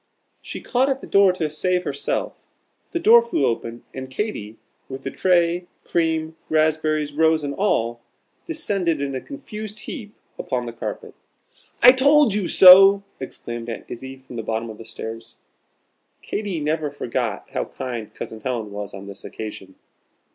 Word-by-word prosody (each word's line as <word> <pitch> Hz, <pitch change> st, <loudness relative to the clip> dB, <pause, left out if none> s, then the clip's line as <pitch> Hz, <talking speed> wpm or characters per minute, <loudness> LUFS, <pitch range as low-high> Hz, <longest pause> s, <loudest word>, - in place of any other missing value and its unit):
She -, -, -7 dB
caught 260 Hz, +2 st, +1 dB
at 270 Hz, 0 st, -1 dB
the -, -, -8 dB
door 200 Hz, -1 st, +5 dB
to 170 Hz, -4 st, -1 dB
save 180 Hz, +4 st, 0 dB
herself; 140 Hz, -4 st, -3 dB, 0.4 s
the 340 Hz, -, -2 dB
door 455 Hz, +7 st, +7 dB
flew 465 Hz, -8 st, 0 dB
open; 115 Hz, 0 st, -3 dB
and 130 Hz, 0 st, -7 dB
Katy, 130 Hz, -, -4 dB, 0.3 s
with 135 Hz, 0 st, -7 dB
the 135 Hz, -, -4 dB
tray, 175 Hz, -1 st, +2 dB, 0.2 s
cream, 160 Hz, -1 st, 0 dB
raspberries, 155 Hz, -1 st, +1 dB
rose 160 Hz, 0 st, +3 dB
and 140 Hz, -1 st, -3 dB
all, 120 Hz, -, 0 dB, 0.5 s
descended 195 Hz, -, -1 dB
in 140 Hz, -1 st, -2 dB
a 130 Hz, -, -3 dB
confused 215 Hz, -6 st, -8 dB
heap 220 Hz, -8 st, -8 dB, 0.3 s
upon 125 Hz, -1 st, -2 dB
the 120 Hz, -, -6 dB
carpet. 115 Hz, -, -6 dB, 0.7 s
"I 250 Hz, -, +11 dB
told 280 Hz, -2 st, +5 dB
you 200 Hz, -3 st, 0 dB
so!" 195 Hz, +2 st, +9 dB, 0.2 s
exclaimed 120 Hz, -3 st, -6 dB
Aunt 115 Hz, -, -6 dB
Izzie 130 Hz, +2 st, -8 dB
from 130 Hz, -2 st, -11 dB
the -, -, -2 dB
bottom 110 Hz, +1 st, -3 dB
of 110 Hz, -, -12 dB
the 115 Hz, -, -10 dB
stairs. 115 Hz, 0 st, -8 dB, 0.9 s
Katy 205 Hz, -5 st, -3 dB
never 155 Hz, 0 st, -1 dB
forgot 120 Hz, -6 st, -3 dB
how -, -, -2 dB
kind 120 Hz, -4 st, -6 dB
Cousin 110 Hz, -, -7 dB
Helen 115 Hz, -3 st, -3 dB
was 100 Hz, -1 st, -6 dB
on 100 Hz, 0 st, -9 dB
this 100 Hz, -1 st, -10 dB
occasion. 95 Hz, -3 st, -8 dB
155 Hz, 160 wpm, -22 LUFS, 120-195 Hz, 0.9 s, I